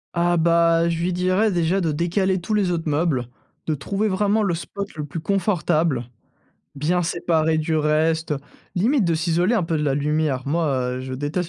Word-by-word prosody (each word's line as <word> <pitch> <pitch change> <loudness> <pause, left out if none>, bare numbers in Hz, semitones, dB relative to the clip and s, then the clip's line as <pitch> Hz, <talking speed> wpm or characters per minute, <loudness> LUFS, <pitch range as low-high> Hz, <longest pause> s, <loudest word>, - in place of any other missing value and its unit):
Ah 175 0 +2
bah, 170 0 +3
je 165 -1 -2
lui 180 - 0
dirais, 185 +4 +1
déjà, 175 +2 +1
de 160 -3 0
décaler 185 +4 0
tous 195 +5 -4
les 205 -3 +2
autres 165 -2 -2
meubles, 145 -5 0 0.4
de 155 - 0
trouver 200 +9 -2
vraiment 205 +2 +1
le 175 -4 +1
spot 200 +4 -6
le 150 -1 -5
plus 150 +3 -6
confortable, 170 - 0 0.7
bien 165 +5 0
séparé 160 -2 +1
du 155 0 0
reste, 155 +1 +1 0.4
limite 225 +5 +2
de 170 - +1
s'isoler 170 +6 +1
un 210 - +2
peu 165 -1 -1
de 150 - -1
la 140 - +1
lumière. 145 -2 0
Moi, 165 +2 +1 0.3
heu, - - -5
je 130 0 -5
déteste 150 +6 -2
170 Hz, 190 wpm, -22 LUFS, 155-185 Hz, 0.7 s, bah